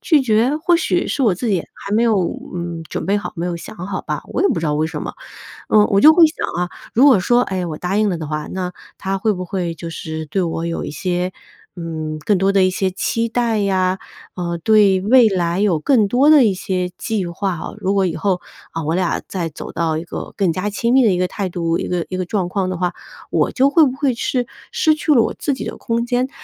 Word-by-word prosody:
拒 305 Hz, -5 st, +3 dB
绝。 240 Hz, +5 st, +2 dB
或 340 Hz, +2 st, +2 dB
许 335 Hz, -, 0 dB
是 275 Hz, -, -1 dB
我 210 Hz, -7 st, +3 dB
自 230 Hz, +5 st, -3 dB
己 190 Hz, -5 st, +2 dB
还 200 Hz, +1 st, -5 dB
没 225 Hz, -, +3 dB
有， 225 Hz, -3 st, +3 dB, 0.4 s
嗯， 170 Hz, -1 st, -4 dB
准 -, -, -4 dB
备 200 Hz, +2 st, +1 dB
好， -, -, -6 dB
没 170 Hz, -, -3 dB
有 175 Hz, -1 st, -2 dB
想 -, -, -10 dB
好 185 Hz, +2 st, -4 dB
吧， -, -, -4 dB
我 -, -, -1 dB
也 395 Hz, -, +4 dB
不 -, -, 0 dB
知 165 Hz, -, -3 dB
道 150 Hz, -, +1 dB
为 155 Hz, +1 st, +1 dB
什 160 Hz, -, -5 dB
么。 -, -, -5 dB, 0.6 s
嗯， 210 Hz, -1 st, +5 dB
我 200 Hz, 0 st, +3 dB
就 310 Hz, -, +9 dB
会 340 Hz, 0 st, +7 dB
想 310 Hz, -, -4 dB, 0.2 s
啊， 180 Hz, -, -1 dB, 0.2 s
如 255 Hz, +5 st, +5 dB
果 255 Hz, -8 st, +6 dB
说， 240 Hz, +5 st, +3 dB
哎， 185 Hz, -5 st, -2 dB
我 155 Hz, -2 st, -5 dB
答 180 Hz, +2 st, -2 dB
应 215 Hz, -1 st, +2 dB
了 175 Hz, -, -1 dB
的 155 Hz, -2 st, -5 dB
话， 150 Hz, 0 st, -3 dB
那 180 Hz, -1 st, -3 dB, 0.2 s
他 195 Hz, 0 st, -2 dB
会 215 Hz, +2 st, +1 dB
不 185 Hz, 0 st, -5 dB
会 175 Hz, -3 st, -3 dB
就 165 Hz, +1 st, -7 dB
是 160 Hz, -1 st, -5 dB
对 185 Hz, +6 st, -1 dB
我 165 Hz, 0 st, -2 dB
有 170 Hz, -, -3 dB
一 -, -, -5 dB
些， 180 Hz, +3 st, -2 dB, 0.4 s
嗯， 160 Hz, -3 st, -5 dB
更 195 Hz, +6 st, +1 dB
多 195 Hz, +2 st, +2 dB
的 195 Hz, -, +4 dB
一 185 Hz, -, +4 dB
些 185 Hz, +1 st, 0 dB
期 230 Hz, +4 st, -1 dB
待 230 Hz, -1 st, 0 dB
呀， 190 Hz, -1 st, +1 dB, 0.4 s
呃， 170 Hz, -1 st, -3 dB
对 200 Hz, +1 st, +4 dB
未 235 Hz, +3 st, +6 dB
来 175 Hz, -2 st, 0 dB
有 190 Hz, -7 st, +2 dB
更 225 Hz, -, +3 dB
多 260 Hz, +8 st, +3 dB
的 290 Hz, -6 st, +7 dB
一 200 Hz, -, +2 dB
些 185 Hz, -1 st, -2 dB
计 215 Hz, -5 st, -2 dB
划 180 Hz, +1 st, -2 dB
哦。 -, -, -7 dB
如 195 Hz, +2 st, 0 dB
果 195 Hz, -1 st, +2 dB
以 175 Hz, -, -2 dB
后， 190 Hz, -3 st, 0 dB, 0.3 s
啊 165 Hz, -1 st, -4 dB
我 160 Hz, +3 st, 0 dB
俩 180 Hz, -1 st, 0 dB
再 175 Hz, -4 st, -3 dB
走 150 Hz, -, -8 dB
到 160 Hz, -2 st, 0 dB
一 165 Hz, -, -4 dB
个 -, -, -7 dB
更 185 Hz, -5 st, +2 dB
加 185 Hz, +4 st, -2 dB
亲 235 Hz, +4 st, 0 dB
密 265 Hz, -1 st, +6 dB
的 215 Hz, -, +4 dB
一 180 Hz, -, +1 dB
个 180 Hz, 0 st, +1 dB
态 195 Hz, -1 st, -4 dB
度 170 Hz, -1 st, -1 dB
一 -, -, -4 dB
个 175 Hz, -2 st, -1 dB
一 185 Hz, -, -4 dB
个 185 Hz, -, -1 dB
状 185 Hz, -1 st, -1 dB
况 185 Hz, 0 st, -1 dB
的 185 Hz, -, -3 dB
话， 180 Hz, 0 st, -1 dB, 0.4 s
我 -, -, +1 dB
就 270 Hz, +2 st, +3 dB
会 315 Hz, +1 st, +5 dB
不 260 Hz, -, 0 dB
会 280 Hz, -3 st, +1 dB
是， 245 Hz, +1 st, -1 dB, 0.2 s
失 340 Hz, -10 st, +3 dB
去 305 Hz, 0 st, +1 dB
了 240 Hz, -, +5 dB
我 -, -, 0 dB
自 285 Hz, -, -1 dB
己 260 Hz, -, -5 dB
的 -, -, -5 dB
空 235 Hz, -1 st, -1 dB
间。 250 Hz, +2 st, 0 dB
190 Hz, 275 characters per minute, -19 LUFS, 175-230 Hz, 0.6 s, 就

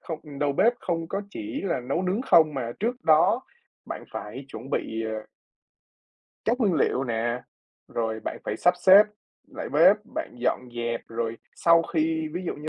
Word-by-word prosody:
không 155 Hz, -4 st, -8 dB
đầu 145 Hz, 0 st, +1 dB
bếp 225 Hz, +12 st, +4 dB
không 165 Hz, -2 st, -2 dB
có 195 Hz, -, -2 dB
chỉ 310 Hz, 0 st, -5 dB
là 170 Hz, -9 st, 0 dB
nấu 135 Hz, +8 st, -2 dB
nướng 190 Hz, +6 st, 0 dB
không 155 Hz, -, +5 dB
mà 120 Hz, -3 st, -3 dB
trước 240 Hz, +3 st, 0 dB
đó 155 Hz, -1 st, +5 dB, 0.5 s
bạn -, -, -6 dB
phải 125 Hz, +6 st, -6 dB
chuẩn 125 Hz, +1 st, -9 dB
bị, 110 Hz, 0 st, -2 dB
ờ 110 Hz, 0 st, -4 dB, 1.2 s
các 240 Hz, +4 st, +1 dB
nguyên 200 Hz, -7 st, +3 dB
liệu 135 Hz, -3 st, +1 dB
nè, 120 Hz, +1 st, -1 dB, 0.5 s
rồi 110 Hz, -1 st, -2 dB
bạn -, -, -5 dB
phải 105 Hz, -, -2 dB
sắp 180 Hz, +9 st, +3 dB
xếp 190 Hz, +3 st, +8 dB, 0.5 s
lại -, -, -6 dB
bếp, -, -, +6 dB, 0.2 s
bạn -, -, -4 dB
dọn -, -, +1 dB, 0.2 s
dẹp 120 Hz, 0 st, -2 dB
rồi 115 Hz, 0 st, -3 dB, 0.2 s
sau 170 Hz, 0 st, +5 dB
khi 160 Hz, -1 st, -1 dB
ví 175 Hz, +2 st, -4 dB
dụ -, -, -2 dB
như 150 Hz, +2 st, -7 dB
155 Hz, 180 wpm, -26 LUFS, 120-180 Hz, 1.2 s, xếp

